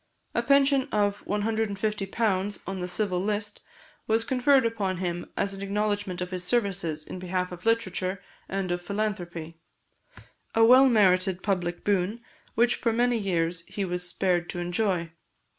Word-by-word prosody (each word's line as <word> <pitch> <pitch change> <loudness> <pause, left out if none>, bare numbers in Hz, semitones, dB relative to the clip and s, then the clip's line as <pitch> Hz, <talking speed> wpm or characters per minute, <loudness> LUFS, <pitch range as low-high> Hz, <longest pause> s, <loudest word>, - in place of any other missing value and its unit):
A - - +1
pension 275 +2 +3
of 205 -1 +1
£150 205 -1 -1
on 195 +1 -4
the 180 - -2
civil 180 0 -1
list 210 0 -1 0.5
was 225 +1 +2
conferred 260 +1 +3
upon 205 -5 -1
him 175 -1 -3
as 200 - +1
an 195 - -7
acknowledgment 205 -2 -1
of 180 +1 -4
his 180 -1 -4
services 180 -7 -1
in 185 - -7
behalf 180 0 -2
of 180 +4 -7
literature 195 -4 0 0.3
and 190 -2 -2
of 175 0 -1
philanthropy; 175 -5 -4 1.0
a 225 0 +6
well 260 +3 +8
merited 185 -4 +3
public 175 -4 -1
boon 205 +2 +1 0.4
which 240 +2 +4
for 230 - +1
many 240 +1 +2
years 170 -3 0
he 200 - -3
was 180 -1 -2
spared 175 -2 0
to 175 - -4
enjoy. 175 -1 -1
195 Hz, 150 wpm, -27 LUFS, 180-220 Hz, 1.0 s, well